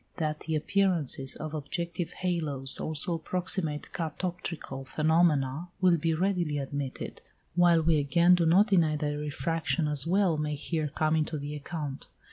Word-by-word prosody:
That 155 Hz, -2 st, -1 dB
the 160 Hz, 0 st, -3 dB
appearances 155 Hz, -6 st, +1 dB
of 155 Hz, 0 st, -6 dB
objective 170 Hz, +3 st, -3 dB
halos 150 Hz, -7 st, 0 dB
also 155 Hz, +2 st, -1 dB
approximate 165 Hz, -2 st, -2 dB
catoptrical 165 Hz, -4 st, -4 dB
phenomena 155 Hz, -1 st, +2 dB
will 180 Hz, -2 st, +4 dB
be 165 Hz, +1 st, 0 dB
readily 175 Hz, -4 st, 0 dB
admitted, 140 Hz, -1 st, -5 dB, 0.3 s
while 170 Hz, -1 st, +4 dB
we 160 Hz, -1 st, +3 dB
again 170 Hz, +5 st, +4 dB
do 170 Hz, -2 st, +3 dB
not 185 Hz, +6 st, +6 dB
deny 170 Hz, -7 st, +3 dB
that 145 Hz, 0 st, -2 dB
refraction 150 Hz, +2 st, -1 dB
as 150 Hz, 0 st, -1 dB
well 185 Hz, -2 st, +2 dB
may 150 Hz, -1 st, -1 dB
here 155 Hz, +2 st, -2 dB
come 155 Hz, +2 st, 0 dB
into 155 Hz, 0 st, 0 dB
the 145 Hz, +1 st, -5 dB
account. 145 Hz, -2 st, -6 dB
160 Hz, 145 wpm, -29 LUFS, 150-175 Hz, 0.3 s, not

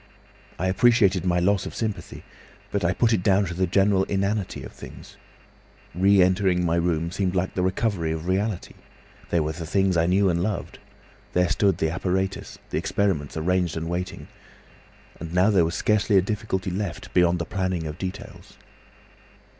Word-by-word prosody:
I 90 Hz, -, -2 dB
appreciated 100 Hz, -2 st, +3 dB
my 90 Hz, -1 st, +2 dB
loss 95 Hz, +2 st, +1 dB
of -, -, -8 dB
sympathy, 105 Hz, -6 st, -4 dB, 0.5 s
but 100 Hz, -, -1 dB
I 85 Hz, -, +2 dB
put 115 Hz, +5 st, +2 dB
it 105 Hz, -, +1 dB
down 100 Hz, +1 st, +3 dB
to 90 Hz, -, -5 dB
the 90 Hz, +2 st, 0 dB
general 95 Hz, +1 st, +3 dB
inanity 100 Hz, 0 st, -2 dB
of -, -, -9 dB
things. -, -, -12 dB, 0.8 s
Re 95 Hz, +2 st, +4 dB
entering 90 Hz, -1 st, +2 dB
my 85 Hz, 0 st, +1 dB
room 85 Hz, -1 st, 0 dB
seemed 95 Hz, -1 st, -1 dB
like 95 Hz, +1 st, -1 dB
the 90 Hz, -, -1 dB
recovery 95 Hz, -2 st, 0 dB
of 80 Hz, 0 st, -4 dB
reality. 95 Hz, +1 st, -1 dB, 0.6 s
There 85 Hz, -2 st, +1 dB
were 75 Hz, -, -2 dB
the 80 Hz, +1 st, -7 dB
things 95 Hz, 0 st, +2 dB
I 85 Hz, 0 st, +2 dB
knew 95 Hz, +2 st, +3 dB
and 85 Hz, -2 st, +1 dB
loved. 100 Hz, +2 st, -3 dB, 0.5 s
There 90 Hz, -1 st, +2 dB
stood 95 Hz, -2 st, +2 dB
the 80 Hz, -, 0 dB
apparatus, 95 Hz, +2 st, -2 dB
the -, -, 0 dB
experiments 85 Hz, -8 st, -1 dB
arranged 90 Hz, 0 st, 0 dB
and 80 Hz, 0 st, -4 dB
waiting. 90 Hz, +2 st, -4 dB, 0.9 s
And 85 Hz, +1 st, -7 dB
now 95 Hz, +4 st, +4 dB
there 90 Hz, -5 st, +4 dB
was 85 Hz, -, -3 dB
scarcely 105 Hz, -1 st, +2 dB
a -, -, +6 dB
difficulty 100 Hz, -2 st, -3 dB
left, 90 Hz, -1 st, -5 dB
beyond 90 Hz, -1 st, +3 dB
the 85 Hz, -, -3 dB
planning 95 Hz, -2 st, -2 dB
of 75 Hz, -1 st, -6 dB
details. 95 Hz, +2 st, -8 dB
95 Hz, 175 wpm, -24 LUFS, 85-100 Hz, 0.9 s, a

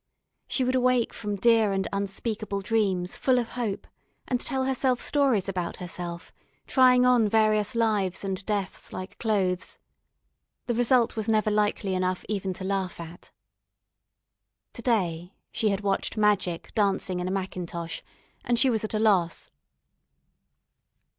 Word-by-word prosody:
She 260 Hz, -, 0 dB
would 255 Hz, +1 st, +1 dB
awake 255 Hz, -2 st, +2 dB
from 205 Hz, -2 st, -4 dB
dear 220 Hz, 0 st, +4 dB
and 195 Hz, 0 st, -1 dB
unspeakable 200 Hz, +1 st, -3 dB
dreams 195 Hz, -4 st, 0 dB
full 260 Hz, -1 st, +2 dB
of 235 Hz, -2 st, -1 dB
hope, 230 Hz, -5 st, -3 dB, 0.4 s
and 250 Hz, -, 0 dB
tell 265 Hz, -3 st, -1 dB
herself 260 Hz, -1 st, +1 dB
stories 265 Hz, -10 st, +2 dB
about 180 Hz, -3 st, -3 dB
herself, 175 Hz, -1 st, -6 dB, 0.3 s
trying 250 Hz, -1 st, +5 dB
on 245 Hz, -4 st, +4 dB
various 215 Hz, +1 st, +2 dB
lives 210 Hz, -6 st, +1 dB
and 195 Hz, -1 st, -3 dB
deaths 200 Hz, -4 st, -3 dB
like 185 Hz, +1 st, -7 dB
clothes. 190 Hz, -5 st, 0 dB, 0.9 s
The 240 Hz, -, -1 dB
result 240 Hz, 0 st, +3 dB
was 220 Hz, 0 st, -2 dB
never 215 Hz, -1 st, +2 dB
likely 210 Hz, -2 st, 0 dB
enough 185 Hz, 0 st, -1 dB
even 195 Hz, -2 st, -2 dB
to 185 Hz, -, -8 dB
laugh 190 Hz, -2 st, -2 dB
at. 170 Hz, +1 st, -10 dB, 1.4 s
To -, -, -8 dB
day 180 Hz, -7 st, -1 dB, 0.2 s
she 215 Hz, -, 0 dB
had 200 Hz, 0 st, -1 dB
watched 200 Hz, +2 st, -1 dB
magic 200 Hz, -5 st, +1 dB
dancing 195 Hz, -3 st, 0 dB
in 180 Hz, -, -2 dB
a -, -, -2 dB
mackintosh, 180 Hz, -3 st, -4 dB, 0.4 s
and 240 Hz, -, +1 dB
she 260 Hz, +2 st, +4 dB
was 220 Hz, -2 st, 0 dB
at 215 Hz, -, -3 dB
a -, -, +1 dB
loss. 190 Hz, -6 st, +1 dB
205 Hz, 145 wpm, -26 LUFS, 185-230 Hz, 1.4 s, trying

